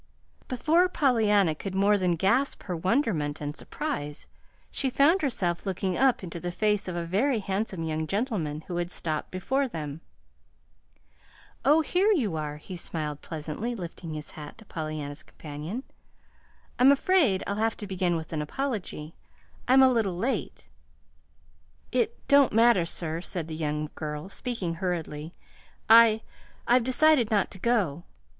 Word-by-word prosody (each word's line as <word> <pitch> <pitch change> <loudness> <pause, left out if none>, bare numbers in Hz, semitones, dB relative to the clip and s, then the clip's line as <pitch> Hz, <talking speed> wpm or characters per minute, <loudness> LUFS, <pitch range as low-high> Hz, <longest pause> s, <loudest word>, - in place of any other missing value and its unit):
Before 320 +8 +3
Pollyanna 215 - +3
could 190 +5 -6
more 200 +2 +4
than 180 -3 +1
gasp 235 - +1
her 180 - -3
wonderment 170 - 0
and 145 0 -4
surprise, 150 - -5 0.5
she 270 - -1
found 290 +9 +4
herself 190 - -1
looking 190 -1 -2
up 265 -5 +3
into 170 -1 -6
the 175 +1 -4
face 210 +2 0
of 180 - -4
a 170 -1 -2
very 225 +10 +1
handsome 195 -3 -2
young 160 0 -2
gentleman, 195 - -2
who 175 +2 -5
had 175 0 -1
stopped 155 -4 -3
before 265 +9 0
them. 155 - -6 1.6
"Oh, 300 +3 +5
here 370 +6 +2
you 225 - 0
are," 150 -1 -4
he 180 +5 -9
smiled 155 -4 -4
pleasantly, 160 +10 -4
lifting 170 -4 -7
his 150 0 -6
hat 150 -1 -10
to 220 - -15
Pollyanna's 155 -3 -5
companion. 155 - -7 1.0
"I'm 260 +2 +7
afraid 280 - +3
I'll 200 - -2
have 225 +1 0
to 210 - -6
begin 185 -3 0
with 160 0 -5
an 155 - -1
apology 180 - -4 0.5
I'm 265 +1 +7
a 260 - +6
little 200 -7 0
late." 240 +8 -3 1.2
"It 470 +1 -1
don't 280 -4 +5
matter, 225 -6 +5
sir," 165 0 -3
said 175 -3 -4
the 160 - -5
young 150 -1 -2
girl, 150 +2 -5
speaking 200 -7 -3
hurriedly. 165 -3 -3 0.5
"I 225 -1 +7 0.4
I've 245 0 +4
decided 260 -1 +4
not 205 -3 +1
to 190 - -10
go." 185 -9 +1
190 Hz, 150 wpm, -27 LUFS, 160-240 Hz, 1.6 s, I'm